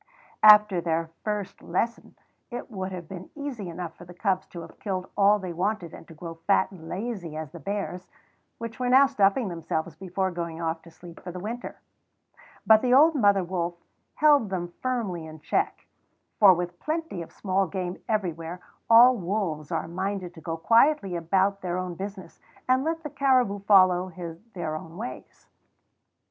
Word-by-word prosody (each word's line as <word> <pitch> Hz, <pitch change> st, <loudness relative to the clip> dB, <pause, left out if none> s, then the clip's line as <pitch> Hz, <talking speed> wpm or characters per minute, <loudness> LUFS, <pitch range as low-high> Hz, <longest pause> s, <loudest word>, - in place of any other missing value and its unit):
After 210 Hz, -4 st, +8 dB
their 165 Hz, -1 st, -1 dB
first 205 Hz, -2 st, -3 dB
lesson 230 Hz, +7 st, -2 dB, 0.3 s
it 245 Hz, -1 st, -7 dB
would 190 Hz, -2 st, -4 dB
have 175 Hz, -3 st, -7 dB
been 185 Hz, 0 st, -9 dB
easy 270 Hz, -10 st, -5 dB
enough 170 Hz, -1 st, -6 dB
for -, -, -13 dB
the 175 Hz, 0 st, -13 dB
cubs 190 Hz, -1 st, 0 dB
to 170 Hz, -, -8 dB
have -, -, -13 dB
killed 185 Hz, -3 st, -3 dB
all 205 Hz, +1 st, +5 dB
they 185 Hz, -4 st, -6 dB
wanted 185 Hz, -1 st, -2 dB
and -, -, -12 dB
to 165 Hz, -, -13 dB
grow 165 Hz, +1 st, -8 dB
fat 200 Hz, -, +3 dB
and 165 Hz, -4 st, -11 dB
lazy 190 Hz, -6 st, -4 dB
as 155 Hz, -3 st, -6 dB
the -, -, -10 dB
bears, 195 Hz, -2 st, -4 dB, 0.5 s
which 230 Hz, +1 st, -7 dB
were 250 Hz, -1 st, 0 dB
now 265 Hz, +2 st, +7 dB
stuffing 240 Hz, -3 st, +2 dB
themselves 165 Hz, -1 st, -3 dB
before 190 Hz, +1 st, -2 dB
going 170 Hz, -2 st, -5 dB
off 165 Hz, -1 st, -2 dB
to 170 Hz, -, -15 dB
sleep 170 Hz, 0 st, -13 dB
for 180 Hz, -, -7 dB
the 180 Hz, -, -7 dB
winter; 230 Hz, +6 st, -6 dB, 0.9 s
but 220 Hz, -1 st, +7 dB
the 250 Hz, 0 st, +3 dB
old 315 Hz, +4 st, +7 dB
mother 200 Hz, -8 st, +3 dB
wolf 175 Hz, -1 st, -2 dB, 0.4 s
held 290 Hz, -8 st, +4 dB
them 175 Hz, -2 st, -4 dB
firmly 210 Hz, -11 st, -2 dB
in 155 Hz, 0 st, -11 dB
check, -, -, -1 dB, 0.5 s
for 205 Hz, -3 st, +9 dB
with 175 Hz, 0 st, -4 dB
plenty 315 Hz, -, -3 dB
of 165 Hz, -, -9 dB
small 190 Hz, -1 st, 0 dB
game 180 Hz, +1 st, -4 dB
everywhere, 175 Hz, -5 st, -2 dB, 0.3 s
all 240 Hz, +3 st, +8 dB
wolves 180 Hz, -6 st, -3 dB
are 160 Hz, -2 st, -1 dB
minded 185 Hz, +1 st, -3 dB
to 160 Hz, -, -13 dB
go 165 Hz, 0 st, -4 dB
quietly 230 Hz, -, +3 dB
about 190 Hz, +4 st, +1 dB
their 180 Hz, -1 st, -2 dB
own 185 Hz, -1 st, -3 dB
business 190 Hz, -1 st, -8 dB, 0.3 s
and 255 Hz, +1 st, +3 dB
let 325 Hz, +1 st, -2 dB
the 300 Hz, -, -4 dB
caribou 260 Hz, -7 st, +2 dB
follow 185 Hz, -2 st, +5 dB, 0.4 s
their 160 Hz, -3 st, -3 dB
own 160 Hz, +2 st, -8 dB
ways. 235 Hz, +4 st, -8 dB
190 Hz, 175 wpm, -26 LUFS, 170-215 Hz, 0.9 s, for